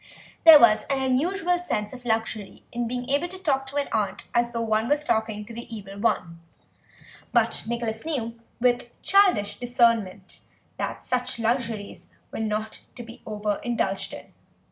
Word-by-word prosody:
There 320 -2 +12
was 215 -4 +5
an 275 -1 +1
unusual 340 +8 +1
sense 210 -12 -3
of 250 -1 -10
luxury 225 -3 -2
in 240 0 -2
being 245 +1 -4
able 285 +5 +1
to 375 +2 -8
talk 275 -7 0
to 275 - -7
an 285 -1 0
aunt 215 -2 -2
as 240 0 +2
though 230 -1 -2
one 220 0 +1
was 295 +1 +2
talking 220 -5 -1
to 230 - -10
the 235 +1 -9
Evil 200 -1 -9
One, 170 -6 0 0.9
but - - +2
Nicholas 230 -1 -3
knew, 235 -7 -3 0.2
with 240 -1 0
childish 380 - +3
discernment, 230 -6 +1 0.4
that - - -4
such 250 0 -1
luxuries 230 -3 -2 0.2
were - - -5
not 215 0 -3 0.2
to 240 - -7
be 230 0 -12
over 210 -1 -2
indulged 225 -5 -1
in. - - -13
235 Hz, 165 wpm, -25 LUFS, 215-265 Hz, 0.9 s, There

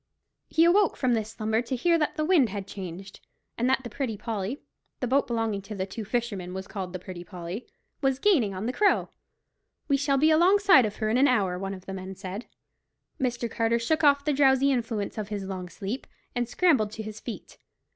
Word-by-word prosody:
He 325 - +3
awoke 385 +2 +4
from 255 -2 +2
this 220 -2 -1
slumber 220 0 -1
to 250 +2 -3
hear 335 +7 +2
that 300 - 0
the 310 -2 0
wind 310 -9 +4
had 200 -1 -5
changed, 190 0 -8 0.4
and 245 +2 +1
that 265 0 +2
the 240 - -6
Pretty 230 -3 -3
Polly—the 225 +4 -6
boat 275 +3 +2
belonging 225 -4 -1
to 210 +2 -8
the 190 -1 -2
two 205 +3 -7
fishermen 205 -5 -3
was 190 0 -5
called 190 -3 -5
the 185 - -4
Pretty 180 -1 -8
Polly—was 185 - -5
gaining 280 - +3
on 190 +3 -4
the 250 - -1
Crow. 410 +5 +2 0.8
"We 280 - +3
shall 275 0 +1
be 310 +4 +4
alongside 360 - +6
of 210 - -7
her 215 -1 -1
in 235 - +3
an 275 +2 +5
hour," 195 -8 +1
one 195 0 -4
of 185 0 -13
the 195 - -6
men 190 0 -6
said. 195 +4 -7 0.7
Mr. 240 -2 -1
Carter 230 0 +1
shook 310 +8 0
off 280 -1 +5
the 300 - +2
drowsy 270 0 +4
influence 225 -5 -2
of 210 - -3
his 205 -2 -4
long 185 -2 -5
sleep, 205 +7 -5 0.3
and 245 -1 -1
scrambled 275 - +3
to 220 - -5
his 215 0 -7
feet. 235 - -8
230 Hz, 205 wpm, -27 LUFS, 195-270 Hz, 0.8 s, alongside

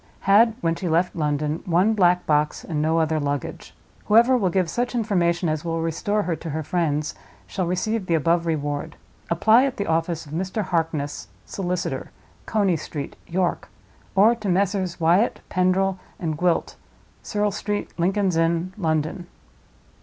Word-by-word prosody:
Had, 215 +3 +5
when 165 -1 +1
she 175 +1 -3
left 170 +3 +1
London, 150 0 -1
one 180 +6 +3
black 180 -3 +3
box, 150 0 +1
and 155 -4 -2
no 160 +2 +2
other 160 -1 +1
luggage. 145 -2 -4 0.3
Whoever 235 +4 +5
will 200 -7 +2
give 185 0 +1
such 245 +8 -2
information 175 -6 +1
as 155 -1 -1
will 165 -1 -2
restore 205 +6 -1
her 175 -3 -1
to 165 - -7
her 155 +1 -3
friends 155 -2 -1 0.3
shall 185 -3 -3
receive 190 +3 -1
the 170 - +2
above 170 +2 +1
Reward. 145 -2 -2 0.3
Apply 220 +9 +5
at 275 -2 -1
the 200 - -2
office 165 -1 -1
of 145 - -13
Mr. 190 +6 -2
Harkness, 160 - -2 0.2
solicitor, 180 -2 -3 0.4
Coney 200 -6 +2
Street, 145 -1 -6
York. 180 0 -1 0.5
Or 210 +4 +6
to 215 -4 -4
Messrs. 185 -1 0
Wyatt, 175 +8 +2
Pendril, 185 +1 +1 0.2
and 160 -3 -2
Gwilt, 175 +2 0 0.4
Serle 210 0 -1
Street, 205 0 -3
Lincoln's 190 0 +1
Inn, 165 +2 +1
London." 160 +1 -1
175 Hz, 155 wpm, -23 LUFS, 160-195 Hz, 0.5 s, Or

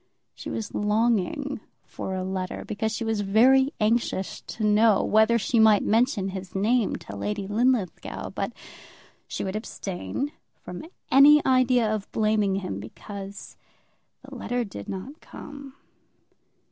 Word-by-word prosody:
She - - -8
was 220 - -5
longing 230 - 0 0.3
for 190 - -5
a 185 - -2
letter, 185 -1 -4
because 220 +1 -2
she 230 - -3
was 225 -2 -1
very 255 +7 +4
anxious 215 -3 0
to 220 - -5
know 210 0 +4
whether 220 +2 +4
she 230 +2 +1
might 220 -2 +6
mention 225 -3 +2
his 190 -1 -7
name 220 +3 +2
to - - -9
Lady 205 -1 -3
Linlithgow; 225 -2 -1
but 195 +2 -3 0.8
she - - -4
would 190 0 -3
abstain 215 +5 -4 0.3
from 180 - -8 0.3
any 295 +2 +7
idea 255 -3 +3
of 215 -2 -3
blaming 215 -3 +1
him 185 - -4
because 195 - -9 0.7
the - - -12
letter 245 0 -2
did 180 - -8
not 245 - -7
come. 280 -2 -11
215 Hz, 135 wpm, -25 LUFS, 195-245 Hz, 0.8 s, any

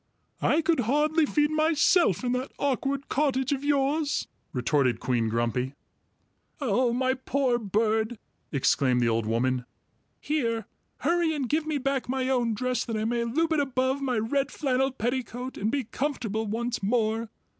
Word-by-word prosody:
"I 320 +2 +3
could 330 -3 +2
hardly 300 +6 +2
feed 295 +1 +2
myself 310 - +3
in 245 - 0
that 250 +2 -2
awkward 275 0 -1
cottage 265 -2 +1
of 280 -1 -1
yours!" 290 +1 +1 0.2
retorted 125 0 +1
Queen 120 -3 0
Grumpy. 120 +4 -1 0.8
"Oh, 250 -2 +2
my 260 +2 +1
poor 260 -1 0
bird!" 220 +2 0 0.3
exclaimed 135 -2 +2
the 120 - +3
old 115 -1 0
woman. 125 +3 +1 0.6
"Here, 230 -8 -1 0.4
hurry 335 +1 +2
and 275 -4 -2
give 310 +4 0
me 310 -2 0
back 275 -2 -1
my 260 0 0
own 240 -4 +1
dress 255 +3 -1
that 230 -2 -3
I 215 - -1
may 235 +1 0
loop 320 +8 +1
it 310 - +2
above 265 0 0
my 255 -4 0
red 270 +6 0
flannel 265 -2 +1
petticoat 250 +1 -3
and 210 - -1
be 280 -1 0
comfortable 225 -3 -2
once 235 +3 -2
more. 225 +1 0
250 Hz, 155 wpm, -27 LUFS, 220-280 Hz, 0.8 s, I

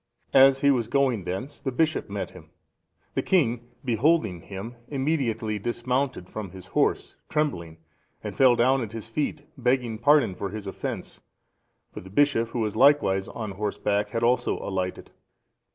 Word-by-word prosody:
As 135 0 +6
he 140 - +5
was 120 -5 +1
going 125 -6 +1
thence, 125 +12 -5
the 135 -1 -3
bishop 155 -1 0
met 100 -2 -4
him. - - -14 0.6
The - - 0
king, 120 -9 +1 0.2
beholding 115 - +2
him, 100 +6 -7
immediately 130 -7 -1
dismounted 125 -1 -2
from 105 -1 -6
his 95 0 -11
horse, - - 0
trembling, 85 - -1 0.5
and - - -5
fell 130 -2 +6
down 130 +3 +3
at 115 -2 -5
his 115 0 -7
feet, 145 +4 -2 0.2
begging 125 -3 0
pardon 145 -4 +4
for 100 +2 -4
his 105 +1 -7
offence; 95 - -6 0.7
for - - -7
the 95 - -12
bishop, 115 0 +2
who 120 - -3
was 105 -2 -1
likewise 135 -9 +4
on 110 -3 -5
horseback, 105 +1 -1
had 115 -1 -2
also 125 +2 +2
alighted. 95 -2 -4
115 Hz, 155 wpm, -26 LUFS, 100-135 Hz, 0.7 s, As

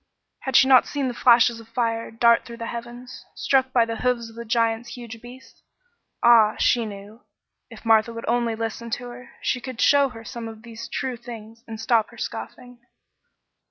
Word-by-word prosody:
Had 265 -2 -4
she 265 - +7
not 260 -2 +6
seen 280 -2 -2
the 250 - -3
flashes 235 -1 +4
of 225 - -14
fire 230 -1 -2
dart 235 +1 +3
through 235 -1 -10
the 230 - -5
heavens, 240 +2 -8
struck 260 -1 +1
by 240 -3 +3
the 230 0 -4
hoofs 235 -1 -1
of - - -18
the 235 - -7
giants' 230 +1 -1
huge 230 -2 -9
beasts? 245 +2 -14 0.6
Ah! 225 -3 +6
She 235 -2 +2
knew! 205 +3 -11 0.5
If - - -13
Martha 225 0 +4
would 230 0 -7
only 235 -1 0
listen 225 +1 -5
to 245 0 -9
her, 245 +1 -11
she 250 - -1
could 255 -2 -8
show 280 -1 +4
her 225 -2 -12
some 230 +1 -7
of 220 0 -11
these 230 0 -9
true 255 -2 -3
things 230 -1 -11
and 220 -1 -7
stop 220 0 +2
her - - -16
scoffing. 245 -1 -7
235 Hz, 195 wpm, -23 LUFS, 225-245 Hz, 0.6 s, she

